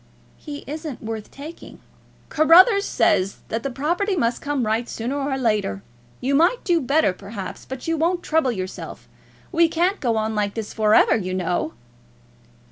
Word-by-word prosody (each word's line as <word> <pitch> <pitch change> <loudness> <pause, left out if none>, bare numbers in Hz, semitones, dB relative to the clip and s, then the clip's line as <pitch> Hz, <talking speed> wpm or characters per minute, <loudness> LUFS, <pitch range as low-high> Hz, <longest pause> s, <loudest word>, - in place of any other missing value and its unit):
"He 290 -2 -8
isn't 305 -3 -6
worth 220 -1 -5
taking." 305 +4 -11 0.5
"Carruthers 370 +7 +6
says 190 +2 +1
that 225 - -2
the 275 - -3
property 345 +10 -1
must 235 -7 0
come 285 -4 -1
right, 225 +3 -1
sooner 240 +5 -3
or 275 -1 -1
later. 210 - 0 0.4
You 270 +2 -1
might 340 - +3
do 345 -3 +2
better, 275 -6 +2
perhaps, 195 +1 -8
but 265 +2 -7
you 330 0 0
won't 345 +3 0
trouble 310 -5 +1
yourself. 185 -4 -7 0.4
We 335 -1 +4
can't 355 +5 +1
go 235 -5 0
on 220 0 -1
like 205 -1 -1
this 220 -2 -5
for 215 -1 +3
ever, - - +5
you 185 -3 -2
know." 175 -3 -1
265 Hz, 165 wpm, -22 LUFS, 215-320 Hz, 0.5 s, Carruthers